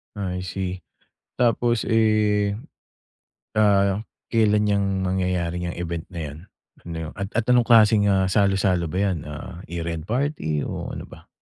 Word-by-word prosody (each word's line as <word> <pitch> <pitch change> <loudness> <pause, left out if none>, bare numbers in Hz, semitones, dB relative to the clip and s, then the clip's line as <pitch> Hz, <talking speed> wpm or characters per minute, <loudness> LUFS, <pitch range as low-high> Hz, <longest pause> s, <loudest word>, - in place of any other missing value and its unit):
Ah, 95 -3 -3
I - - -3
see. 95 0 -4 0.6
Tapos, 120 -1 +2
eh, 105 -2 +2 1.0
ah, 100 -1 +3 0.3
kelan 105 -2 +3
'yang 100 -1 +2 0.2
mangyayari 90 -2 -1
'yang 85 - -5
event 85 -1 -4
na 85 - -6
'yan? 75 -1 -6 0.5
Ano 80 -2 -5
at 95 0 -4 0.2
anong 120 -1 +5
klaseng, 110 -3 +6
ah, 95 -1 +2
salu-salo 95 -3 +2
ba 90 - -3
'yan? 95 -4 +1
Ah, 85 +5 -8
year 85 -1 -5
end 80 -1 -5
party 115 - -1
o - - -5
ano - - -7
ba? - - -15
95 Hz, 145 wpm, -23 LUFS, 85-105 Hz, 1.0 s, klaseng